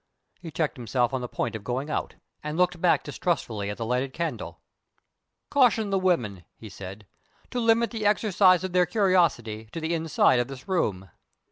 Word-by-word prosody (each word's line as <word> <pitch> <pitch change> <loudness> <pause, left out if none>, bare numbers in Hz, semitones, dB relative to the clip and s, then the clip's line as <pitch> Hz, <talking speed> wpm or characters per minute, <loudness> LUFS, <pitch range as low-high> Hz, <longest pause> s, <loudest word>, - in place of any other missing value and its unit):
He 170 - -8
checked 155 -2 -2
himself 120 +1 0
on 130 - -1
the 125 - -4
point - - -3
of 110 - -6
going 130 +6 -3
out, - - -3 0.3
and 150 +1 -4
looked 180 -1 +1
back 180 - +3
distrustfully 110 - -2
at 105 - -5
the 115 - -3
lighted 125 +3 -1
candle. 170 0 -4 0.9
"Caution 230 -7 +3
the 195 - +2
women," 120 - 0
he 110 - -11
said, 95 +2 -9 0.5
"to 250 - -2
limit 230 0 +3
the 220 -3 -1
exercise 195 -3 +4
of 190 -1 -4
their 180 -1 +4
curiosity 170 - +1
to - - -4
the 160 +1 -2
inside 160 -6 +3
of 120 - 0
this 135 -1 -10
room." 95 - -1
160 Hz, 180 wpm, -26 LUFS, 120-185 Hz, 0.9 s, exercise